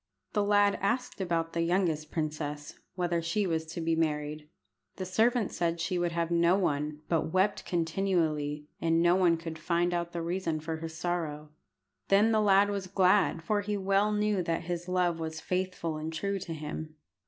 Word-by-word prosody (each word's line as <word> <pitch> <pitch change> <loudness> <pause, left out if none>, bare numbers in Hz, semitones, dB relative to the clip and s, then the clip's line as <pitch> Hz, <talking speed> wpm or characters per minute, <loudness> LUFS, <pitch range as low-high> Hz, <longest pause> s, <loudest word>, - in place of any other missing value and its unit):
The 210 - +2
lad 205 0 +3
asked 240 +2 -1
about 165 -3 -1
the 170 - 0
youngest 165 -3 0
princess, 150 -2 -4 0.2
whether 175 -2 0
she 170 +5 0
was 160 -3 -1
to 165 +2 -6
be 165 0 +1
married. 150 -1 -2 0.5
The 185 - -4
servant 220 +4 +2
said 170 -1 -1
she 175 +2 -1
would 175 -1 0
have 170 0 -1
no 170 +2 +4
one, 150 -4 -1
but 160 -1 0
wept 190 +3 +1
continually, 160 -4 0 0.2
and 165 0 +3
no 175 +1 +5
one 175 -3 +4
could 165 -1 -7
find 175 +2 +1
out 170 0 -2
the 170 -1 -4
reason 170 -2 -1
for 160 +1 -4
her 165 +1 -5
sorrow. 160 -3 -3 0.6
Then 205 +3 +4
the 215 -1 +3
lad 200 0 +4
was 200 -2 -3
glad, 185 -2 +3
for 205 +4 +1
he 205 0 -2
well 195 +2 +2
knew 210 -2 +1
that 165 -1 -1
his 175 +1 -4
love 180 -2 +1
was 160 -1 -4
faithful 180 -3 -2
and 155 +1 -4
true 200 +5 -2
to 175 - -7
him. 155 +1 -6
170 Hz, 185 wpm, -30 LUFS, 160-190 Hz, 0.6 s, no